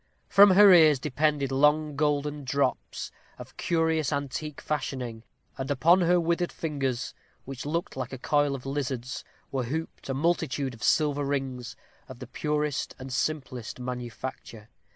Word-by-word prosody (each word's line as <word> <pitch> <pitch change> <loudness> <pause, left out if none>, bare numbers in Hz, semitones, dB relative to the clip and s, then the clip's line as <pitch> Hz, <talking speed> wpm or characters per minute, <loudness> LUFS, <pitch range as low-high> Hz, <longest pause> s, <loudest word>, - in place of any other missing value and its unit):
From 200 +1 +7
her 200 -1 +9
ears 155 -4 +7
depended 145 0 0
long 150 +2 +3
golden 145 0 0
drops, 135 0 -2 0.3
of - - -11
curious 160 -3 0
antique 145 +1 -3
fashioning; 130 -6 -3 0.4
and 135 - -3
upon 170 +6 +4
her 175 +1 +4
withered 170 +1 0
fingers, 135 -6 -3 0.3
which 135 +1 -7
looked 165 +3 -2
like 130 -1 -4
a 135 - -5
coil 145 +2 +1
of 130 - -9
lizards, 130 -3 -3 0.3
were 130 -2 -1
hooped 160 +3 -5
a 135 - -1
multitude 140 -3 0
of 115 - -14
silver 145 -2 +2
rings, 135 -3 -3 0.3
of 130 -3 -10
the 130 - -8
purest 150 +2 -2
and 130 0 -7
simplest 130 -6 -3
manufacture. 125 -2 -7
140 Hz, 145 wpm, -27 LUFS, 130-155 Hz, 0.4 s, her